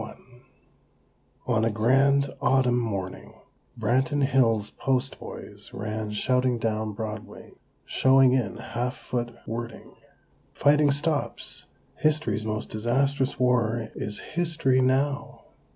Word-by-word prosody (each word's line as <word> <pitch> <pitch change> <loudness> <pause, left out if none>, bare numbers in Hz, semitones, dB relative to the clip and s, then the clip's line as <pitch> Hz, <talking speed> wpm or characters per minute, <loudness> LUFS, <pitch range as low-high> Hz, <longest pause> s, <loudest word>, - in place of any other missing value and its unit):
XXXI - - -8 1.3
On 115 -3 +1
a 115 - +3
grand 135 +6 +3
autumn 125 -2 +3
morning 100 -5 -4 0.4
Branton 130 +5 +1
Hills' 115 -6 +2
"Post" 135 0 -1
boys - - -10
ran 110 +1 -4
shouting 125 +3 +1
down 110 -1 -2
Broadway, 110 0 -7 0.3
showing 130 -1 +4
in 115 -4 0
half 120 +2 -3
foot 120 -1 -4
wording: 115 0 -6 0.6
"FIGHTING 150 0 +4
STOPS!! 140 -2 -1 0.3
HISTORY'S 135 -9 +1
MOST 110 0 -3
DISASTROUS 130 +5 0
WAR 120 -3 +1
IS 105 0 -4 0.2
HISTORY 160 -6 +2
NOW!!!" 135 +3 0
125 Hz, 105 wpm, -26 LUFS, 110-135 Hz, 1.3 s, showing